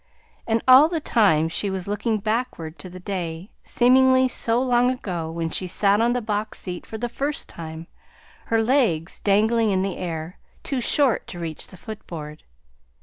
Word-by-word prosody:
And 225 0 +1
all 265 +5 +8
the 335 -2 -1
time 200 - +3
she 195 +5 -2
was 190 -1 -4
looking 215 +2 -1
backward 215 -7 -3
to 185 - -8
the 185 +1 -10
day, 180 -1 -5
seemingly 260 +1 +4
so 235 -1 +1
long 245 -1 +3
ago, 180 -10 -3
when 165 0 -3
she 185 - -3
sat 200 +3 +3
on 235 +1 +2
the 245 -1 -2
box 215 0 -3
seat 180 -2 -6
for 220 - -6
the 240 +2 -2
first 280 +5 -3
time, 160 0 -8 0.6
her 225 -1 +2
legs 220 - +1
dangling 220 +3 +2
in 190 -1 +1
the 195 -2 -3
air, 165 -1 -5 0.2
too 270 -3 -2
short 265 0 +1
to 175 - -8
reach 165 -2 -5
the 185 - -14
footboard. 170 -8 -8
210 Hz, 175 wpm, -23 LUFS, 175-240 Hz, 0.6 s, all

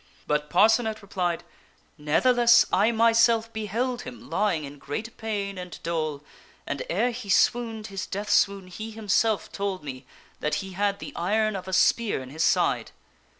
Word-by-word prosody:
But 150 0 -1
Parcenet 220 +1 +3
replied, 180 -4 -2 0.3
" - - -35
Ne'theless, 235 +11 +5
I 210 +4 +4
myself 230 0 +3
beheld 235 +3 -2
him 250 -1 -10
lying 195 -6 +1
in 145 0 -9
great 215 +13 -5
pain 200 -3 -4
and 180 -1 -8
dole, 155 -3 -2 0.4
and, - - -4
ere 250 - +1
he 230 -3 -8
swooned 225 +2 +2
his 195 - -4
death 205 +2 -4
swoon, 200 -2 +3
he 215 +5 -7
himself 215 -2 0
told 195 -4 -3
me 130 -2 -8 0.3
that 150 - -1
he 195 -1 -4
had 200 +2 0
the - - -8
iron 215 +4 +1
of 190 -1 -6
a 190 - -5
spear 220 +1 +3
in 130 - -11
his 160 +3 -1
side." - - +2
205 Hz, 165 wpm, -26 LUFS, 175-225 Hz, 0.4 s, Ne'theless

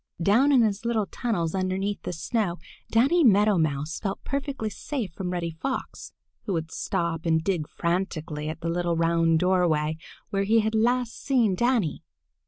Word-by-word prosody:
Down 220 +11 +4
in 255 -4 +5
his 210 -1 0
little 230 -3 0
tunnels 185 -7 -2
underneath 190 +2 -1
the - - -4
snow 180 +2 -1 0.3
Danny 280 +10 +4
Meadow 210 -4 +5
Mouse 150 0 -1
felt 195 -2 -4
perfectly 275 -6 -3
safe 235 - -4
from 185 0 -4
Reddy 175 -2 -2
Fox, 260 +12 -5 0.4
who 200 - 0
would 165 -1 -3
stop 170 -1 -2
and 160 -1 +2
dig 170 -5 -1
frantically 165 -4 -2
at 160 +1 -6
the 165 - -2
little 175 0 0
round 165 0 +3
doorway 165 -4 +2 0.3
where 195 -1 +1
he 225 +2 +4
had 220 +1 -1
last 240 +2 +1
seen 240 -8 +2
Danny. 235 - +1
190 Hz, 165 wpm, -26 LUFS, 165-225 Hz, 0.4 s, in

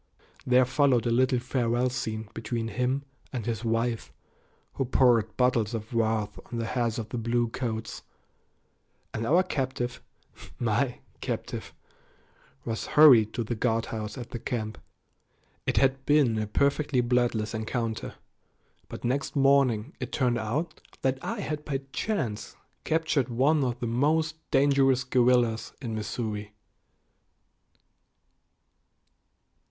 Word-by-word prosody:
There 125 0 +5
followed 130 -2 +2
a 120 - +1
little 130 +2 +3
farewell 120 0 0
scene 110 -3 -3
between 115 0 -3
him 125 +4 -1 0.3
and 120 -5 -4
his 115 -1 -2
wife, 115 0 -1 0.6
who 135 - -1
poured 120 -4 +3
bottles 120 -3 +2
of 110 +1 -6
wrath 110 -3 0
on 120 - -3
the 115 - -1
heads 115 -1 -1
of 110 -2 -5
the 120 - -3
"bluecoats," 115 0 -2 1.1
and 115 0 -2
our 175 +6 +5
captive 130 -6 -3 0.6
my - - 0 0.2
captive - - -4 0.9
was 115 -1 -3
hurried 125 -8 +8
to 120 - 0
the 115 - -3
guardhouse 110 -1 -2
at 120 -2 -7
the 120 - -4
camp. 110 -4 -4 0.9
It - - +1
had 135 0 +3
been 140 -7 +4
a 110 - -2
perfectly 140 +3 +1
bloodless 120 -3 +1
encounter, 110 0 -3 0.7
but - - -8
next 135 +5 -1
morning 135 -3 +3
it - - -5
turned 125 -3 +1
out 125 +10 -3 0.2
that 130 0 +1
I 225 -1 -3
had 150 -4 -4
by 140 -2 -2
chance 140 - -2 0.3
captured 160 -5 +1
one 140 +5 +3
of 120 -2 -2
the - - -2
most 155 +7 +1
dangerous 135 -2 +3
guerrillas 125 -3 +2
in 120 -4 -5
Missouri. 105 -1 -4
120 Hz, 125 wpm, -27 LUFS, 115-135 Hz, 1.1 s, hurried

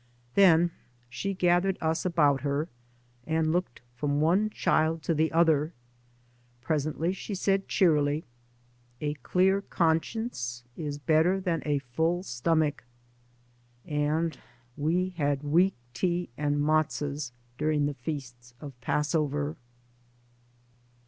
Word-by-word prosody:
Then 175 -3 +5 0.4
she 195 +9 -3
gathered 180 +1 +2
us 160 +2 -1
about 150 -6 +3
her, 145 +2 -1 0.6
and 160 0 +1
looked 175 -7 -2
from 145 +3 -1
one 180 +8 +3
child 160 -5 +1
to 165 - +1
the 160 +1 +1
other. 160 -1 +3 0.9
Presently 155 +5 -1
she 195 +1 -5
said 195 +1 +1
cheerily, 150 -5 +2 0.4
*' - - -35 0.3
A 150 -1 -1
clear 190 +5 +2
conscience 165 - -1
is 150 -3 -4
better 160 +6 +3
than 175 -5 -1
a 145 -1 +2
full 160 +7 -1
stomach." 150 +1 0 1.0
And 155 +2 0 0.4
we 170 +5 0
had 145 -2 0
weak 175 +6 +3 0.2
tea 175 +7 -1
and 145 +1 0
metzos 145 -2 0 0.3
during 150 -1 +1
the 145 - -1
feasts 125 -3 -7
of 140 0 -8
Passover. 150 +1 0
155 Hz, 115 wpm, -28 LUFS, 145-175 Hz, 1.0 s, Then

